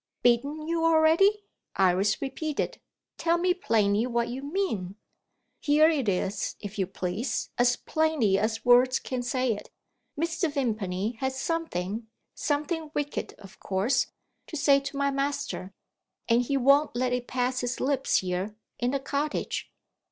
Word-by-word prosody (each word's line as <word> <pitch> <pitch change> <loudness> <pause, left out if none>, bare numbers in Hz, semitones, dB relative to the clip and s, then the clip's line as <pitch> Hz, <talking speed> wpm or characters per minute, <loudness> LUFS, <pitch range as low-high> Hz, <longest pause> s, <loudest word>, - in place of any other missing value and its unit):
"Beaten 280 +6 +2
you 330 0 0
already?" 330 +6 +4 0.3
Iris 195 +5 +2
repeated. 290 +2 -3 0.4
"Tell 335 0 +2
me 360 +1 +2
plainly 220 - +1
what 235 -1 0
you 255 +3 -5
mean?" 280 - -2 0.6
"Here 310 +2 +5
it 275 -9 0
is, 195 +2 -1
if 205 0 -7
you 190 - +1
please, 190 +6 -3
as 245 0 +4
plainly 300 -14 +1
as 220 +2 -1
words 250 +1 +6
can 255 -1 -4
say 250 -1 0
it. 205 - -9 0.5
Mr. 335 0 0
Vimpany 220 -5 -2
has 265 0 -2
something 225 - -2 0.3
something 305 +2 -2
wicked, 290 0 -3
of 200 0 -14
course 195 +7 +1 0.4
to 315 - -5
say 280 -1 +5
to 275 0 -6
my 280 0 +1
master; 275 -8 -2 0.6
and 235 +1 +4
he 275 +3 0
won't 275 +2 +4
let 250 0 0
it 250 -1 -2
pass 250 0 0
his 245 0 -2
lips 270 0 +1
here, 185 +3 -3 0.2
in 245 - +1
the 275 +1 0
cottage." 285 +2 -2
255 Hz, 145 wpm, -27 LUFS, 220-295 Hz, 0.6 s, words